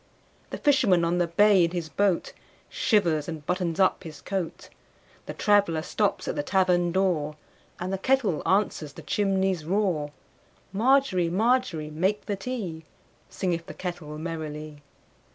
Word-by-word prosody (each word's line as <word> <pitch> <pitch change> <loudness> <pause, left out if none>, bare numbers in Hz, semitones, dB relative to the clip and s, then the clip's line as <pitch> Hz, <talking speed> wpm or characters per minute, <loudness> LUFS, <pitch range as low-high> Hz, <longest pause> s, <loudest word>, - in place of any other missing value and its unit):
The - - -5
fisherman 235 -13 +3
on 175 +1 0
the 175 - +2
bay 195 +2 +5
in 170 - +2
his 170 -2 -4
boatShivers 175 - 0
and 160 -3 -6
buttons 180 -1 -1
up 190 0 +3
his 155 -4 -9
coat; 185 -4 -4 0.6
The - - -6
traveller 200 -7 +2
stops 205 +3 -1
at - - -2
the 145 - 0
tavern 180 +1 +2
door, 170 -5 0 0.4
And 185 +2 -3
the 195 - -2
kettle 240 - +1
answers 190 -7 0
the 165 - -11
chimney's 190 0 0
roar. 170 -4 0 0.6
Margery, 225 -5 +3
Margery, 200 -6 +1
make 190 +7 0
the 205 - -2
tea, 195 -7 -5 0.5
Singeth 170 -3 -2
the - - -8
kettle 175 -4 -6
merrily. 155 -2 -6
180 Hz, 140 wpm, -26 LUFS, 160-200 Hz, 0.6 s, bay